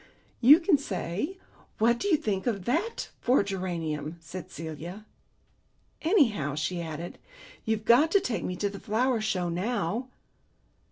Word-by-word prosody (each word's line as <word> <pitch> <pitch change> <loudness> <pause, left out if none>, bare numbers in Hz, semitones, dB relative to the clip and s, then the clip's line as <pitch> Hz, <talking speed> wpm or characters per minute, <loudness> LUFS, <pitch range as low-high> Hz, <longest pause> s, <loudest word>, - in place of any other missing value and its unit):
"You 280 +7 +8
can 330 -4 +3
say, 205 - -3 0.4
'What 235 +2 +3
do - - -1
you 345 -6 +4
think 205 -4 -2
of 200 -6 -1
that 335 - -1
for 255 +2 +3
a - - -1
geranium?'" 170 -5 -3
said 170 +2 -8
Celia. 165 +6 -7 1.0
"Anyhow," 230 - +2
she 170 +4 -2
added, 165 +1 -6 0.5
"you've 220 -1 -1
got 255 +8 +6
to 400 - +7
take 225 - -2
me 180 - -3
to 205 - -1
the 200 - -8
Flower 235 +3 +1
Show 185 -5 0
now." 205 +5 -1
205 Hz, 150 wpm, -28 LUFS, 170-250 Hz, 1.0 s, You